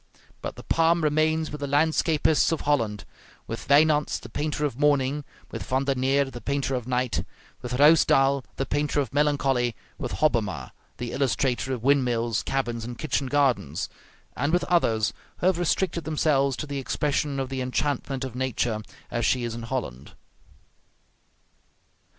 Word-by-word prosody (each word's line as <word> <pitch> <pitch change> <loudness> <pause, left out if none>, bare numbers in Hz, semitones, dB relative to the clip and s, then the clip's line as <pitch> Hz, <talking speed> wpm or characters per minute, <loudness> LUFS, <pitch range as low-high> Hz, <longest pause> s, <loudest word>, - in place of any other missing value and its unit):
But - - -5
the - - -10
palm 165 0 +2
remains 155 +1 +1
with 150 -1 -7
the 140 - -2
landscapists 155 +2 +2
of 165 - -1
Holland; 115 -9 0 0.4
with 115 - -6
Wynants 150 +1 +4
the 120 - -11
painter 150 +4 -2
of 140 - -2
morning, 145 -1 +2 0.3
with - - -5
Van 130 +1 0
der 140 0 +1
Neer 135 +2 +2
the 125 -3 -8
painter 140 +2 -1
of 125 -2 -3
night, 125 -1 0 0.4
with - - -5
Ruysdael 140 -1 +5
the 135 - -2
painter 145 +1 0
of 135 -5 -2
melancholy, 135 -5 +1 0.2
with - - -4
Hobbema 105 - 0 0.3
the 120 -1 -4
illustrator 135 -1 0
of 125 -3 -3
windmills, 120 -5 +2
cabins, 120 -4 -2
and 120 +1 -6
kitchen 140 -2 -1
gardens, 130 - +1 0.5
and 145 - 0
with 175 0 +2
others 115 -11 +2 0.2
who - - -3
have 185 -2 +3
restricted 175 0 0
themselves 145 -3 +1
to - - -4
the 140 -1 -4
expression 140 +1 -1
of 135 -1 -2
the 135 -1 -3
enchantment 135 +1 -2
of 130 -3 -5
nature 125 -3 -1 0.3
as 120 - -1
she 125 +2 +2
is 120 -1 -3
in 120 - -6
Holland. 115 - -5
135 Hz, 160 wpm, -26 LUFS, 125-150 Hz, 0.5 s, Ruysdael